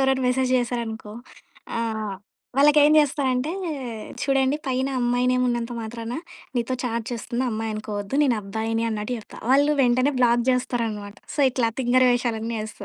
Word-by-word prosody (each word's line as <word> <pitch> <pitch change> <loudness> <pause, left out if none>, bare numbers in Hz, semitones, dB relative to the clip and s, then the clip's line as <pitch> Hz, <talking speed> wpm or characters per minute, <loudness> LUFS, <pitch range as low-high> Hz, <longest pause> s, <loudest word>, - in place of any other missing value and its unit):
ఎవరన్న 265 0 +2
మెసేజ్ 255 0 +1
జేశారనుకో, 235 -3 -3 0.7
ఆహ్, 220 -3 -2 0.4
వాళ్ళకేం 295 +1 +6
జేస్తా 290 -1 +2
అంటే, 255 +5 -1 0.7
"చూడండి 270 0 +2
పైన 260 0 0
అమ్మాయి 245 +1 +1
నేమున్నంత 245 -1 0
మాత్రాన, 230 +1 -6 0.4
నీతో 240 +2 0
చాట్ 230 -2 -2
చేస్తుంది 240 +2 -2
అమ్మాయనుకోవద్దు, 215 -1 -4
నేనబ్బాయిని." 225 -2 0
అన్నట్టు 215 +2 -3
జెప్తా. 215 - -12
వాళ్ళు 285 +3 +5
వెంటనే 255 +3 +3
బ్లాక్ 240 -1 +4
జేస్తారనమాట. 230 -5 -2 0.2
సో, - - -11
ఇట్లా 245 -2 +1
తింగరి 255 0 +4
వేషాలన్నీ 230 -2 -1
యేస్తా. 215 -1 -7
240 Hz, 130 wpm, -24 LUFS, 225-255 Hz, 0.7 s, వాళ్ళకేం